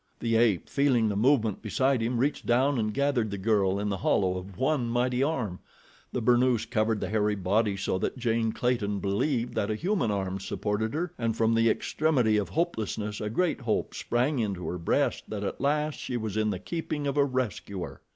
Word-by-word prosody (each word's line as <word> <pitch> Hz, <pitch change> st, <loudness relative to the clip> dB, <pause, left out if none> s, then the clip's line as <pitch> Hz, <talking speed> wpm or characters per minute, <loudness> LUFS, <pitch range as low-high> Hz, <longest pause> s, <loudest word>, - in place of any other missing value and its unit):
The 115 Hz, -1 st, 0 dB
ape, 110 Hz, -5 st, +3 dB
feeling 135 Hz, -5 st, +2 dB
the 100 Hz, -, -2 dB
movement 110 Hz, -2 st, +2 dB
beside 130 Hz, +3 st, +1 dB
him, 120 Hz, +2 st, 0 dB
reached 140 Hz, +5 st, -1 dB
down 130 Hz, +2 st, +3 dB
and 110 Hz, -1 st, 0 dB
gathered 140 Hz, -3 st, +1 dB
the 100 Hz, -, -4 dB
girl 100 Hz, -1 st, +2 dB
in 105 Hz, 0 st, -1 dB
the 100 Hz, -, -1 dB
hollow 95 Hz, 0 st, +1 dB
of 90 Hz, 0 st, -7 dB
one 130 Hz, -1 st, +1 dB
mighty 125 Hz, +2 st, +1 dB
arm. 125 Hz, -, -1 dB, 0.5 s
The 125 Hz, -, -2 dB
burnoose 120 Hz, -1 st, +3 dB
covered 110 Hz, -2 st, 0 dB
the 95 Hz, -, -3 dB
hairy 105 Hz, 0 st, +1 dB
body 100 Hz, +2 st, +1 dB
so 95 Hz, -1 st, -1 dB
that -, -, -2 dB
Jane 115 Hz, -2 st, 0 dB
Clayton 110 Hz, -4 st, 0 dB
believed 115 Hz, +6 st, -1 dB
that 100 Hz, -, -1 dB
a 110 Hz, -, 0 dB
human 180 Hz, -, 0 dB
arm 95 Hz, -2 st, -2 dB
supported 105 Hz, +5 st, -2 dB
her, 175 Hz, +2 st, -2 dB
and 115 Hz, -1 st, -1 dB
from 115 Hz, 0 st, +3 dB
the 115 Hz, 0 st, +4 dB
extremity 125 Hz, -4 st, +1 dB
of 105 Hz, -, -1 dB
hopelessness 110 Hz, -, -2 dB
a 105 Hz, -, -2 dB
great 165 Hz, +6 st, 0 dB
hope 115 Hz, -3 st, -1 dB
sprang 125 Hz, +4 st, 0 dB
into 95 Hz, -7 st, -2 dB
her 90 Hz, -, -4 dB
breast 85 Hz, -, 0 dB
that 105 Hz, -2 st, -4 dB
at 100 Hz, -, -4 dB
last 150 Hz, +2 st, 0 dB
she 125 Hz, -, -3 dB
was 110 Hz, -3 st, -4 dB
in 110 Hz, 0 st, +1 dB
the 100 Hz, -, -1 dB
keeping 155 Hz, -, -4 dB
of 140 Hz, 0 st, -1 dB
a 145 Hz, -, +4 dB
rescuer. 125 Hz, -8 st, -3 dB
115 Hz, 200 wpm, -28 LUFS, 105-130 Hz, 0.5 s, the